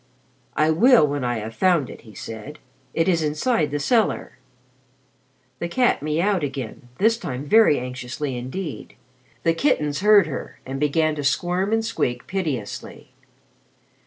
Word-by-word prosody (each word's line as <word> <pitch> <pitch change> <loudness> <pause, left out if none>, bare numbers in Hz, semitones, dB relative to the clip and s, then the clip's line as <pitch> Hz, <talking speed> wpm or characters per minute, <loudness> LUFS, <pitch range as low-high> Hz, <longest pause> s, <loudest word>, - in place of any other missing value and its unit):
"I 155 +1 +4
will 230 - +6
when 145 -2 -2
I 120 -1 0
have 110 +1 -6
found 170 -1 +2
it," - - -11
he 110 -3 -15
said. 115 +10 -8 0.3
"It 165 - 0
is 170 -3 +2
inside 155 - +1
the 145 - -2
cellar." 220 - 0 1.2
The 170 - -2
cat 245 +8 +2
miaued 170 +6 0
again, 135 -4 -5
this 225 +3 +3
time 135 - -5
very 215 -2 +5
anxiously 125 +2 -5
indeed. 130 +9 -6 0.5
The 165 - +3
kittens 150 - +1
heard 205 -1 +6
her 145 -5 -7
and 135 +1 -5
began 155 +2 +2
to 145 - -3
squirm 175 +7 0
and 225 0 +1
squeak 120 - -2
piteously. 150 - -4
150 Hz, 145 wpm, -23 LUFS, 135-190 Hz, 1.2 s, will